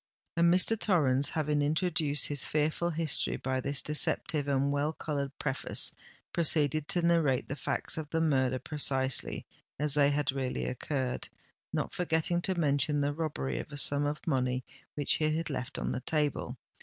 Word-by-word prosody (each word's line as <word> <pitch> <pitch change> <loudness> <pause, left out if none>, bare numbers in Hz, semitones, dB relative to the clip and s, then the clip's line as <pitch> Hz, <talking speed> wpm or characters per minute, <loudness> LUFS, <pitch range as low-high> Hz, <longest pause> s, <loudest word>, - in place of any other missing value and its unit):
And 170 0 +4
Mr. 185 +5 +3
Torrens, 145 -10 +2
having 150 -2 0
introduced 155 -1 +2
his 145 -2 0
fearful 155 +3 0
history 160 -3 0
by 130 0 -2
this 140 +1 -1
deceptive 150 -1 -1
and 140 0 +1
well 145 +2 0
coloured 140 -3 -4
preface, 135 -2 -1 0.4
proceeded 155 -2 +2
to 175 - +1
narrate 160 -7 +2
the 140 - -4
facts 155 - -2
of 150 -2 -6
the 165 - 0
murder 130 -5 +2
precisely 135 -2 +1 0.3
as 150 0 +2
they 145 -1 +4
had 145 -2 +1
really 130 -1 -2
occurred,—not 130 0 -4
forgetting 175 0 0
to 185 -1 -1
mention 145 -1 +2
the 145 +1 0
robbery 145 - -3
of - - -7
a 145 - -7
sum 145 +1 +2
of 150 +1 -4
money 130 -4 0 0.3
which 145 -2 +1
he 155 0 +1
had 165 -1 -3
left 125 -2 -4
on - - -2
the - - -2
table. 150 +1 -1
145 Hz, 165 wpm, -30 LUFS, 135-160 Hz, 0.4 s, And